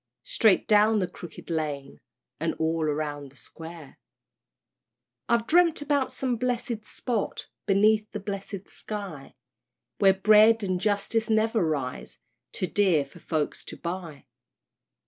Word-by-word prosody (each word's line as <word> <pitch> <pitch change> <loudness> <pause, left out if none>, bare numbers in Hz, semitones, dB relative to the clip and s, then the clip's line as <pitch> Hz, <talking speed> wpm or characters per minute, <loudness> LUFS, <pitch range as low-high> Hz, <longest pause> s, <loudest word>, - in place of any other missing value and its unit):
"Straight 215 -4 +3
down 215 +1 +5
the 190 - +1
Crooked 170 0 -10
Lane, 145 -4 -3 0.4
And - - -1
all 160 0 0
round 145 -2 -3
the - - -21
Square," 160 +1 -11 1.3
I've 235 -1 +2
dreamt 335 -1 +4
about 285 -2 +1
some 255 -3 -1
blessed 235 -2 -2
spot, 235 -4 -3 0.2
Beneath 210 +2 +3
the 210 - -4
blessed 200 -1 -6
sky, 195 -10 -7 0.6
Where 195 -1 +5
Bread 215 +3 +6
and 185 -2 -1
Justice 215 +2 0
never 220 -1 +2
rise 140 -6 -3 0.3
Too - - -2
dear 180 -7 +2
for 140 +5 -16
folks 155 -3 -2
to - - -8
buy. 170 -5 -6
195 Hz, 125 wpm, -27 LUFS, 160-220 Hz, 1.3 s, Bread